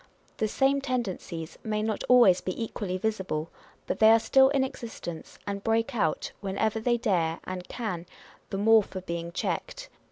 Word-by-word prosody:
The 220 - +1
same 275 +5 +2
tendencies 195 - -4
may 215 -1 -1
not 220 -1 -2
always 235 -8 +6
be 185 - -4
equally 205 -5 -3
visible, 190 -7 -2 0.3
but - - -3
they 220 - +7
are 225 +1 +7
still 265 +3 +5
in 275 -1 +2
existence, 225 -10 -7
and 200 0 -4
break 225 0 +1
out, 210 -9 0
whenever 205 +3 -1
they 240 +2 +1
dare 175 -8 0
and 185 -1 -6
can, 180 -8 -4 0.4
the 195 - -3
more 220 +2 +6
for 190 -2 -7
being 170 -1 -4
checked. - - -3
215 Hz, 165 wpm, -28 LUFS, 185-230 Hz, 0.4 s, they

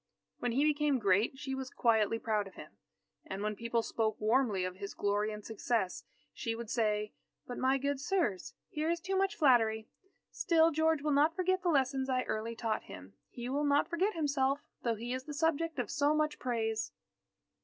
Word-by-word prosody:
When 245 -1 -1
he 275 +4 +3
became 300 -2 +2
great, 205 +3 +2
she 270 -1 -4
was 265 -1 -4
quietly 225 -2 +2
proud 215 -3 -1
of 195 - -14
him. - - -10 0.5
And 195 +1 -5
when 210 0 -1
people 230 +1 -1
spoke 220 -2 -1
warmly 215 -4 +2
of 185 0 -5
his 200 0 -6
glory 205 +1 0
and 210 -1 -8
success, 220 -3 -1 0.3
she 230 -3 -3
would 230 -1 -6
say: 210 -2 0 0.3
"But, 245 - -6
my 265 +1 +3
good 280 0 -1
sirs, 280 - -1
here 310 +1 -2
is 340 0 +1
too 385 +3 -2
much 390 0 +1
flattery. 225 -6 +3 0.4
Still, 330 -1 +3
George 315 -1 +2
will 300 - +1
not 300 +3 +4
forget 370 +1 +1
the 355 - +1
lessons 270 -3 +1
I 255 -1 +1
early 225 +2 -3
taught 225 -2 -2
him. 95 +1 -11 0.2
He 240 0 -6
will 280 +3 0
not 285 +1 +3
forget 375 +5 +1
himself, 280 -3 +1 0.2
though 235 -2 0
he 235 +3 -4
is 255 0 -4
the 295 - -6
subject 325 +1 0
of 245 -5 -2
so 290 +1 +2
much 305 0 0
praise." 225 -3 -1
255 Hz, 195 wpm, -32 LUFS, 220-295 Hz, 0.5 s, not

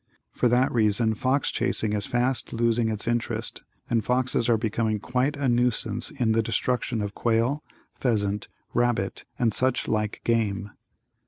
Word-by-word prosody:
For 125 - +1
that 125 +2 +3
reason 110 0 +3
fox 130 +5 0
chasing 110 -3 0
is 105 -1 -1
fast 125 0 0
losing 115 0 +1
its 110 +1 -3
interest 120 0 -2 0.3
and 115 -2 +1
foxes 125 -1 +1
are 115 - +4
becoming 110 0 0
quite 130 +7 0
a 140 -1 0
nuisance 120 -1 +1
in 125 -7 0
the 115 +1 +3
destruction 115 +1 -1
of 100 0 -4
quail, 120 +7 +1 0.3
pheasant, 105 -5 -1 0.3
rabbit 120 -5 0
and 115 -3 +1
such 130 +2 +2
like 105 -1 -1
game. 105 -3 0
115 Hz, 150 wpm, -26 LUFS, 110-125 Hz, 0.3 s, are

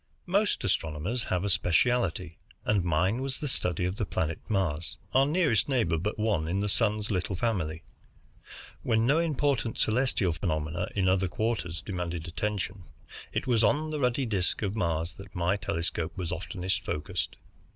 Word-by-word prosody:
Most 200 +4 +1
astronomers 90 +5 -1
have 90 0 0
a 100 - 0
specialty, 90 -2 +2 0.3
and 105 -3 +3
mine 90 +8 +2
was 135 0 -2
the 150 - -3
study 90 - 0
of 90 +2 -2
the - - 0
planet 80 -4 -1
Mars, 90 -3 0 0.2
our 135 +1 +5
nearest 150 - +2
neighbor 100 - +2
but 105 +6 -2
one 105 -8 +1
in 95 +4 0
the 105 +1 0
Sun's 105 0 +2
little 95 0 -1
family. 85 -7 -1 1.0
When 115 -1 +2
no 145 +6 +4
important 145 -7 +1
celestial 110 -6 +2
phenomena 80 +1 -1
in 95 -2 +2
other 95 0 +3
quarters 105 -4 -2
demanded 90 -4 -3
attention, 95 +1 -3 0.5
it - - -1
was 120 -3 +3
on 150 +8 +2
the 155 - -2
ruddy 125 0 +2
disc 100 -2 0
of 100 0 -1
Mars 85 -4 0
that 95 +1 -12
my 90 +2 +2
telescope 85 -3 -2
was 90 -3 -3
oftenest 95 +1 -2
focused. 75 0 -3
95 Hz, 160 wpm, -29 LUFS, 85-115 Hz, 1.0 s, our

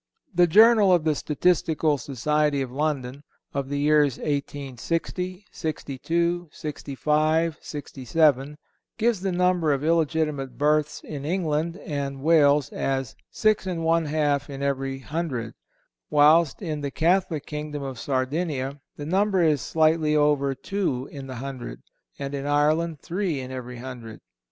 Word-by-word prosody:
The 175 0 +5
Journal 215 +2 +6
of 175 -3 +4
the 155 -1 +2
Statistical 155 -1 +1
Society 145 +4 0
of 125 - -7
London, 140 -2 -2 0.3
of 140 -1 -3
the 145 - -2
years 145 -2 +3
1860, 150 - -3
'62, 165 +3 -2
'65, 155 +2 0
'67, 145 0 0 0.4
gives 225 -3 +1
the 195 -1 -1
number 180 -3 +2
of 140 0 0
illegitimate 155 -4 0
births 150 +1 +1
in 145 -3 -6
England 165 0 -1
and 140 -2 -4
Wales 145 -4 +4
as 135 -2 -2
6 215 -2 +1
1/2 155 -5 0
in 140 0 -6
every 135 -1 -1
hundred, 135 -5 -4 0.6
whilst 155 +4 +4
in 155 -4 -3
the 140 - -2
Catholic 165 0 +1
kingdom 150 -1 -5
of 135 -4 -6
Sardinia 140 +1 -2
the 145 - -7
number 190 +2 +2
is 150 -4 +3
slightly 155 -1 +2
over 145 -2 +2
two 145 -8 -2
in 135 -2 -8
the 130 - -7
hundred, 125 - -7 0.3
and 140 0 -5
in 140 0 -3
Ireland 150 +2 +1
three 175 -4 -2
in 130 0 -6
every 125 -1 -6
hundred. 120 -3 -8
150 Hz, 130 wpm, -25 LUFS, 140-165 Hz, 0.6 s, Journal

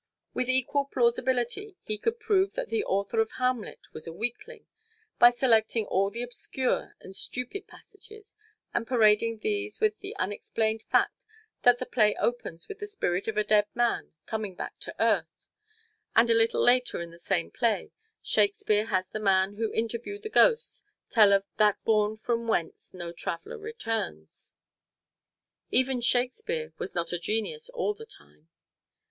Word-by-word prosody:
With 255 - -1
equal 260 +2 +2
plausibility 260 - 0
we 215 -1 +1
could 460 +1 -1
prove 400 -3 +2
that - - -3
the 450 -2 0
author 200 - -1
of 220 0 +1
Hamlet 250 -3 -2
was 155 - -9
a - - -4
weakling, 245 - -5 0.5
by 240 - +10
selecting 230 -3 +2
all 195 +1 +1
the 235 +4 -4
obscure 245 +1 -2
and 190 - -12
stupid 255 - -4
passages, 425 +1 -16 0.4
and 230 - -1
parading 225 -2 +3
these 410 0 -2
with 435 0 +1
the 390 - -6
unexplained 220 +3 -1
fact - - +2 0.4
that 245 0 +6
the 255 - -4
play 215 -5 +3
opens 205 -9 -3
with 410 - -8
the 415 - -5
spirit 195 - -2
of 220 -1 -2
a 215 - +3
dead 210 -1 +3
man 240 0 0
coming 215 -4 -4
back - - -7
to - - -6
earth, 210 -8 +3 0.9
and 230 +1 +5
a - - +7
little 225 0 +3
later 250 +1 +3
in 170 0 -6
the 170 - -15
same 175 -2 -1
play 225 -6 0 0.3
Shakespeare 225 - +2
has 185 -4 0
the 215 - -5
man 195 -1 +2
who 220 +1 -2
interviewed 235 - -3
the 435 - -4
ghost 465 +2 +3 0.3
tell 215 -3 +6
of 195 0 +4
"that 210 -2 +4
bourne 215 -1 +2
from 230 +1 -2
whence 175 -7 -2
no 175 -2 -6
traveler 175 - -6
returns." 225 - -5 1.1
Even 260 -1 +2
Shakespeare 240 -11 0
was - - -5
not 170 0 -1
a 175 - 0
genius 225 - -2
all 480 -4 -1
the 450 +2 -12
time. 75 - -18
230 Hz, 160 wpm, -28 LUFS, 205-280 Hz, 1.1 s, by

